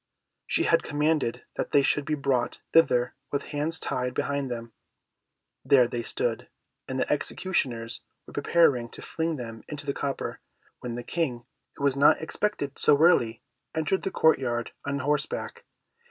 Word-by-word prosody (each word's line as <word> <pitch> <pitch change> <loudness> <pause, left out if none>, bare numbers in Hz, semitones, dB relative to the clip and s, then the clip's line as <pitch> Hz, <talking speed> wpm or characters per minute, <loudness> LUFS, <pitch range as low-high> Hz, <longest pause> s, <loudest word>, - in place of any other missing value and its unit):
She - - +2
had - - +4
commanded 145 -5 0
that - - -3
they 140 - +6
should 145 +1 +1
be 155 - 0
brought 140 -4 0
thither 125 -7 +4 0.2
with 140 - -1
hands 150 +3 +1
tied 125 0 -2
behind 140 -2 -1
them. 115 -2 -6 0.9
There 130 -3 +5
they 120 0 -3
stood, 465 - -2 0.4
and - - -3
the - - +2
executioners 120 -10 -2 0.2
were - - -13
preparing 145 -5 +3
to - - -8
fling 165 0 -2
them 115 -4 -7
into 145 -1 -6
the 140 - -1
copper, 140 0 -3 0.4
when 120 -1 -5
the 120 - -5
King, 125 -6 -2 0.3
who - - -7
was 140 -2 +3
not 140 +1 +5
expected 160 -4 -2
so 150 - +5
early, 120 -9 +4 0.3
entered 160 +4 +1
the - - -2
court 160 -5 +4
yard 120 -3 -2
on 140 0 -1
horseback. 455 - -2
140 Hz, 160 wpm, -27 LUFS, 120-160 Hz, 0.9 s, they